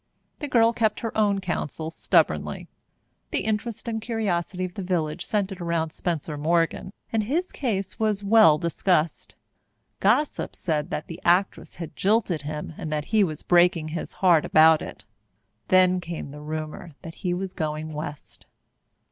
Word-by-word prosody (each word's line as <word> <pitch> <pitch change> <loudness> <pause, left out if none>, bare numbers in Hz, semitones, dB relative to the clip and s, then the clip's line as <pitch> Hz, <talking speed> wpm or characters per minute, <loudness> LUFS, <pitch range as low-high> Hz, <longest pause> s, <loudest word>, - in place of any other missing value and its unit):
The 295 - -4
girl 230 -3 +4
kept 220 -2 0
her 225 - -4
own 205 -2 +2
counsel 160 -3 -3
stubbornly. - - +1 0.6
The - - -1
interest 220 +2 -3
and 225 -1 -2
curiosity 185 -5 -2
of 180 - -7
the 200 - -5
village 170 -5 -1
centred 195 -3 -2
around 165 -2 -1
Spencer 160 -3 -3
Morgan, 165 +4 0 0.2
and 220 -2 +1
his 330 - -1
case 200 -8 -3
was 210 -2 0
well 200 -7 +6
discussed. 170 0 0 0.6
Gossip 300 0 +1
said 155 -4 -2
that 155 - -3
the 165 - -9
actress 180 +3 +1
had 165 -3 -8
jilted 200 -5 +1
him 150 +2 -5
and 155 - -5
that 150 -1 -2
he 215 -2 +5
was 155 -5 -3
breaking 175 -2 +3
his 160 +1 -5
heart 175 -5 +4
about 160 0 +5
it. - - -9 0.6
Then 185 0 +4
came 170 -4 -6
the 150 +1 -10
rumour 155 +2 -6
that 165 -2 -8
he 180 - -1
was 185 0 -4
going 155 -1 -3
West. 150 -1 -8
175 Hz, 155 wpm, -25 LUFS, 155-205 Hz, 0.6 s, well